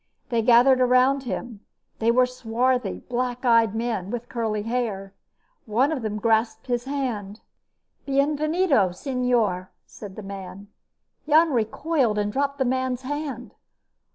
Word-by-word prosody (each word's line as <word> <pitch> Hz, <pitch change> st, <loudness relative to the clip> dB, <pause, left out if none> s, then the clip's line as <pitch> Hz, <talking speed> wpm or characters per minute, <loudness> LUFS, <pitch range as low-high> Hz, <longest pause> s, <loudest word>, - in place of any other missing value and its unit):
They 235 Hz, -2 st, +1 dB
gathered 250 Hz, +3 st, +5 dB
around 255 Hz, +2 st, +3 dB
him. 235 Hz, -3 st, -5 dB, 0.4 s
They 225 Hz, -, +2 dB
were 250 Hz, +2 st, +5 dB
swarthy, 250 Hz, +1 st, -1 dB
black 250 Hz, 0 st, -2 dB
eyed 230 Hz, -3 st, +4 dB
men, 225 Hz, -5 st, -2 dB
with 240 Hz, +2 st, -5 dB
curly 220 Hz, -3 st, -2 dB
hair. 215 Hz, -5 st, -3 dB, 0.5 s
One 245 Hz, +8 st, +2 dB
of 295 Hz, -5 st, -2 dB
them 215 Hz, -1 st, -3 dB
grasped 220 Hz, 0 st, +1 dB
his 245 Hz, -1 st, -2 dB
hand. 235 Hz, -7 st, -4 dB, 0.7 s
"Bienvenido, 290 Hz, -, +2 dB
señor," 235 Hz, -6 st, 0 dB, 0.2 s
said 200 Hz, -3 st, -11 dB
the 215 Hz, -, -8 dB
man. 195 Hz, 0 st, -9 dB, 0.6 s
Jan 315 Hz, +1 st, +5 dB
recoiled 240 Hz, +1 st, 0 dB
and 205 Hz, 0 st, -1 dB
dropped 280 Hz, 0 st, -1 dB
the 265 Hz, -, 0 dB
man's 260 Hz, 0 st, -1 dB
hand. 280 Hz, -3 st, -5 dB
245 Hz, 130 wpm, -24 LUFS, 215-260 Hz, 0.7 s, gathered